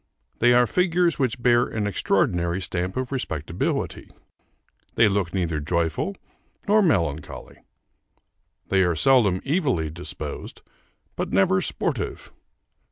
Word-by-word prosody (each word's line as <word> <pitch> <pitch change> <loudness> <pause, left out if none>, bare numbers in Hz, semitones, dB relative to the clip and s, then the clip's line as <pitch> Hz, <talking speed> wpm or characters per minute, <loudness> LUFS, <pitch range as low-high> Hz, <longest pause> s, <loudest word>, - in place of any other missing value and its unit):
They 120 +1 +5
are 125 0 +5
figures 175 +2 +1
which 130 -3 0
bear 120 0 +4
an 110 -2 -3
extraordinary 90 -3 0
stamp 90 +1 -3
of 130 0 -3
respectability. 85 - -3 0.9
They 115 - +5
look 100 -4 0
neither 85 -5 -1
joyful 85 - -1 0.5
nor 210 +1 +5
melancholy. 85 - -1 1.1
They 95 -1 +3
are 90 -2 +2
seldom 105 - +3
evilly 135 - 0
disposed, 85 +3 -7 0.5
but - - -3
never 95 0 +3
sportive. - - -3
95 Hz, 110 wpm, -24 LUFS, 85-130 Hz, 1.1 s, They